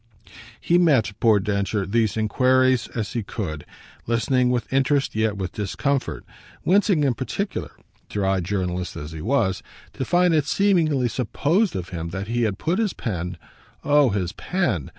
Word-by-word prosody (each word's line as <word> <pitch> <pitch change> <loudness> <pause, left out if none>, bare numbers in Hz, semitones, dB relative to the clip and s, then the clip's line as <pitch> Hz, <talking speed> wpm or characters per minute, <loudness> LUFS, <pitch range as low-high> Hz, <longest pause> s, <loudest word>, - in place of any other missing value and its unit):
He 175 +1 +3
met, 140 -12 +3
poor 110 -3 +4
Densher, 100 0 -1
these 110 +2 0
enquiries 130 +3 +3
as 115 -1 -3
he 120 - -1
could, 90 -7 -5 0.4
listening 125 +2 +2
with 125 +1 -2
interest, 135 +1 +2
yet 110 -1 0
with 95 -2 -3
discomfort; 130 +7 -2 0.4
wincing 190 -4 +3
in 135 -3 +2
particular, 140 - -4 0.4
dry 95 -2 0
journalist 90 -1 -2
as 75 +2 -7
he 80 -1 -7
was, 110 - +1 0.3
to - - -3
find 175 +4 +3
it 150 -3 +2
seemingly 160 -9 +2
supposed 145 - 0
of 90 -1 -4
him 85 -2 -5
that 95 +4 -5
he 120 +1 0
had 100 -3 -1
put 170 - -1
his 215 -5 0
pen 90 -6 -4 0.5
oh 145 -2 +4
his 95 -4 -1
"pen!" 110 - -2
115 Hz, 155 wpm, -23 LUFS, 100-145 Hz, 0.5 s, poor